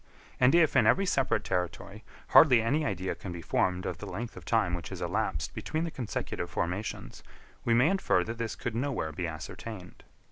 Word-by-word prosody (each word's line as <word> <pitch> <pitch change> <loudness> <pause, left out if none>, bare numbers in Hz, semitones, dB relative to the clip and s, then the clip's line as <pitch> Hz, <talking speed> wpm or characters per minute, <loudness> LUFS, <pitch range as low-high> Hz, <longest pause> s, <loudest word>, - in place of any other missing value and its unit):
And 130 +4 +5
if, 165 -3 +4
in 110 - +5
every 195 +13 +4
separate 135 -7 +1
territory, 90 +4 -3 0.3
hardly 130 -7 +8
any 140 +8 +1
idea 95 -8 -2
can 95 - -8
be 85 -1 -7
formed 90 +3 0
of - - -4
the - - -7
length 115 +1 -5
of - - -11
time 110 -6 +1
which 85 -1 -4
has - - -7
elapsed - - -2
between 155 +1 -3
the 170 - -3
consecutive 125 -7 -4
formations, 95 +5 -4 0.4
we 115 - +3
may 125 +5 +5
infer 190 - +2
that 115 +4 -6
this 115 -2 -3
could 120 - -4
nowhere 120 - -2
be 85 +3 -3
ascertained. 90 +5 -8
115 Hz, 190 wpm, -29 LUFS, 90-130 Hz, 0.4 s, hardly